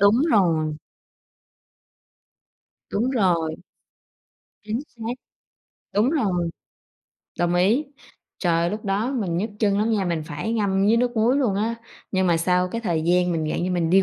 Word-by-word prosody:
đúng 200 +2 +6 0.2
rồi. 160 -7 +2 2.2
Đúng 235 +5 0
rồi. 175 -9 +1 1.1
Chính 215 +3 -2
xác, 230 0 -5 0.8
đúng 215 +6 +3
rồi, 190 - 0 0.9
đồng 175 0 +1
ý, 210 +12 +3 0.5
trời 170 -3 +1
ơi, 170 - +1
lúc 215 +1 -5
đó 205 +5 0
mình 195 -10 -1
nhức 210 +6 -1
chân 205 -2 +2
lắm 220 +2 +1
nha, 205 -3 +1
mình 170 -3 -1
phải 150 +9 -3
ngâm 200 -3 +1
với 220 +2 +4
nước 245 0 0
muối 230 +4 +3
luôn 245 -9 +1
á, 220 +3 0 0.4
nhưng 190 -1 +2
mà 170 - +3
sau 180 +2 +1
cái 230 +5 -4
thời 170 -8 -1
gian 180 +1 +2
mình 160 -2 -1
dạng - - -1
như 185 - -1
mình 170 -2 0
đi 195 +1 +6
195 Hz, 165 wpm, -23 LUFS, 175-220 Hz, 2.2 s, đúng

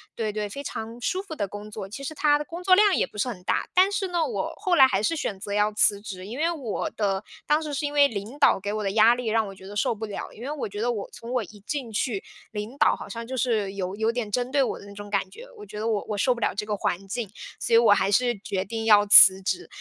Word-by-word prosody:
对 220 -2 -2
对 210 0 -3
非 280 +8 -7
常 230 -2 -6
舒 375 +8 -1
服 320 -6 -8
的 205 - -2
工 205 +2 -9
作， 195 -2 -7
其 275 +6 -8
实 310 - -4
它 295 -1 +3
的 295 - -5
工 340 +1 -8
作 370 0 +6
量 410 -1 +5
也 - - +1
不 210 - -14
是 210 - 0
很 180 -6 -8
大。 - - 0
但 375 +2 +4
是 395 -1 -1
呢， 345 -2 0
我 - - -3
后 365 -2 +1
来 265 -5 +8
还 195 -5 0
是 330 +9 0
选 200 -10 -3
择 200 +1 -5
要 210 +1 +2
辞 205 -1 +3
职， 190 -3 -8
因 235 +5 -7
为 330 +3 +1
我 265 -11 -3
的 200 -1 -1 0.2
当 300 +2 +2
时 300 -2 -5
是 290 +1 -1
因 290 - -6
为 285 -1 +6
领 220 +4 -6
导 - - +4
给 200 +2 -4
我 215 - -2
的 195 - -1
压 225 +3 +5
力， 250 - -6
让 220 -1 +1
我 195 - -9
觉 190 - -14
得 205 - -9
受 215 +2 +1
不 220 - -5
了。 205 -2 -6
因 230 - -11
为 280 - -4
我 290 -8 -4
觉 205 +2 -6
得 245 - +1
我 210 -4 -5
从 235 +1 -9
我 250 - +1
一 205 +1 -14
进 270 -5 -4
去， 210 -1 -2 0.3
领 215 +5 -6
导 - - +4
好 - - -10
像 230 0 -6
就 260 +2 -5
是 220 -5 0
有 190 0 -4
有 220 +1 +1
点 235 -3 -3
针 250 +3 -1
对 285 - +3
我 - - -2
的 - - -13
那 200 - -11
种 205 0 -9
感 195 -2 -1
觉， - - -12
我 420 - -10
觉 210 - -8
得 220 - -2
我 215 -3 -1
我 210 - -2
受 245 +4 +2
不 - - -8
了 - - 0
这 200 - -3
个 210 -1 -1
环 195 +1 -2
境， 230 +2 -3 0.3
所 230 - -2
以 230 - +8
我 230 -3 +5
还 200 -1 +3
是 240 +1 +2
决 190 -1 -2
定 225 +3 -5
要 210 -2 +6
辞 190 -1 +9
职。 360 - -2
220 Hz, 325 characters per minute, -25 LUFS, 205-275 Hz, 0.3 s, 辞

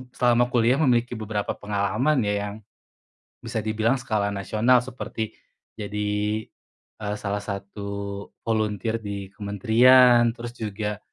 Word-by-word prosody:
selama 120 0 +3
kuliah 120 +3 +3
memiliki 120 -5 +2
beberapa 105 -1 -2
pengalaman 105 +7 +1
ya, 105 0 0
yang 100 - -6 0.9
bisa 115 0 -4
dibilang 110 +3 +1
skala 105 -4 0
nasional 110 +5 +3
seperti 120 -2 -6 0.6
jadi, 105 0 -3 1.0
eee, 105 0 -2
salah 100 0 -1
satu 100 0 -6 0.6
volunteer 110 0 -1
di 100 -3 -6
kementerian, 120 +4 +5
terus 120 0 -7
juga 105 -1 -3
110 Hz, 115 wpm, -25 LUFS, 105-120 Hz, 1.0 s, kementerian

